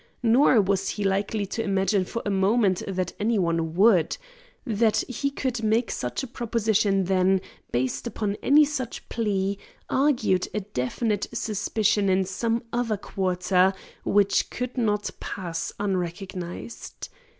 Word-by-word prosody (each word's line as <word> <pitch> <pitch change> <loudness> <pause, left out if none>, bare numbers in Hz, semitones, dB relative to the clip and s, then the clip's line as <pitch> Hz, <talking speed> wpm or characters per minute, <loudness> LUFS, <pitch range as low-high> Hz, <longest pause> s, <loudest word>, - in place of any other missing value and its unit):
Nor 240 0 +5
was 195 0 0
he 205 - -3
likely 200 +2 0
to 210 +4 -3
imagine 195 -1 +1
for 230 +5 -5
a 205 - 0
moment 195 0 +2
that 185 -2 -2
any 225 +2 +1
one 165 -3 0
would. 190 -4 +4 0.5
That 220 -2 +2
he 265 +3 -1
could 260 -4 -3
make 225 +2 +1
such 125 - -3
a - - -4
proposition 220 -5 +1
then, 190 +1 +3 0.3
based 125 - -1
upon 210 -3 -2
any 295 +2 +6
such 265 -5 -5
plea, 200 -3 -1 0.3
argued 245 -10 +2
a 210 - 0
definite 205 - -2
suspicion 210 -2 +1
in 190 0 +2
some 225 +5 -1
other 235 -3 0
quarter, 185 -1 +1 0.3
which 200 -1 +2
could 250 0 -4
not 210 -4 0
pass 170 -4 -4
unrecognised. 185 +1 -4
205 Hz, 135 wpm, -25 LUFS, 190-230 Hz, 0.5 s, any